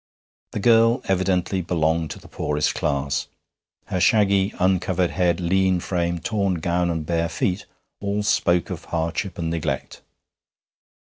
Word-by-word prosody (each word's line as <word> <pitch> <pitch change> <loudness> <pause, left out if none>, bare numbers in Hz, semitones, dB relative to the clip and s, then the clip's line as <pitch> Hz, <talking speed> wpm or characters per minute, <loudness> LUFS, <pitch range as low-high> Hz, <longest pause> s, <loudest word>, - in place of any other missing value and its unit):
The - - -2
girl 115 +2 +4
evidently 95 0 0
belonged 80 -2 0
to - - -7
the - - -15
poorest 75 0 -1
class. 70 0 -1 0.6
Her 90 - -2
shaggy, 100 -1 +3
uncovered 90 -1 +1
head, 90 -2 +1
lean 95 +1 +2
frame, 85 -1 -1
torn 100 +1 0
gown, 85 +1 0
and 80 -2 -2
bare 85 0 0
feet, 90 +3 -2 0.3
all 100 +1 -1
spoke 90 -4 +2
of - - -6
hardship 85 +4 -2
and 85 -2 -2
neglect. 75 -5 -3
90 Hz, 135 wpm, -23 LUFS, 85-95 Hz, 0.6 s, girl